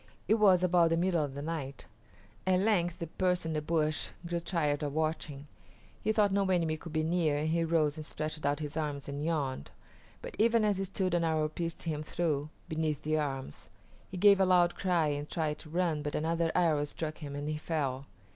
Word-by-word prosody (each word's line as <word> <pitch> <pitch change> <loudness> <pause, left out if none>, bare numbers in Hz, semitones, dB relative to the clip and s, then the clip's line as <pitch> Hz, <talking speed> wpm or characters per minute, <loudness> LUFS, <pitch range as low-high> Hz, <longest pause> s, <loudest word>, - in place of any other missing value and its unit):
It 220 +4 +3
was 190 -4 +5
about 175 -2 +4
the 165 - +2
middle 175 -2 +2
of 140 -2 -5
the 140 - -5
night. 145 -4 -5 0.6
At 185 0 +4
length 180 -5 +2
the 170 - -4
person 180 0 0
in - - -2
the 155 - -1
bush 155 0 0 0.2
grew 170 0 -1
tired 160 -4 0
of 145 -2 -2
watching; 155 -3 -2 0.6
he 215 - +1
thought 210 -2 +3
no 200 -1 +2
enemy 165 -4 +2
could 160 +1 -9
be 155 0 0
near 160 -3 +1
and 155 +2 -1
he 165 +1 +1
rose 160 -2 +1
and 155 - -5
stretched 155 0 -4
out 145 +2 0
his 150 0 -5
arms 150 -3 -3
and 140 +1 -4
yawned, 145 - -2 0.5
but - - -7
even 225 0 +4
as 205 -2 +1
he 195 - -1
stood 185 -1 -1
an 175 -1 +2
arrow 160 -2 +1
pierced 165 +1 -4
him 155 -3 -2
through, 155 -2 -1 0.2
beneath 155 -3 -2
the 155 0 +1
arms. 135 - -4 0.4
He 185 - -6
gave 200 +1 +6
a 190 - +5
loud 180 -1 +4
cry 175 -5 +1
and 145 0 -3
tried 155 -2 -2
to 155 - -11
run, 165 -2 0
but 145 0 -3
another 165 +1 0
arrow 155 -4 +3
struck 155 +1 -5
him, 145 -3 -6
and 145 +1 -4
he 155 0 -2
fell. 140 -4 -2
160 Hz, 215 wpm, -31 LUFS, 150-175 Hz, 0.6 s, gave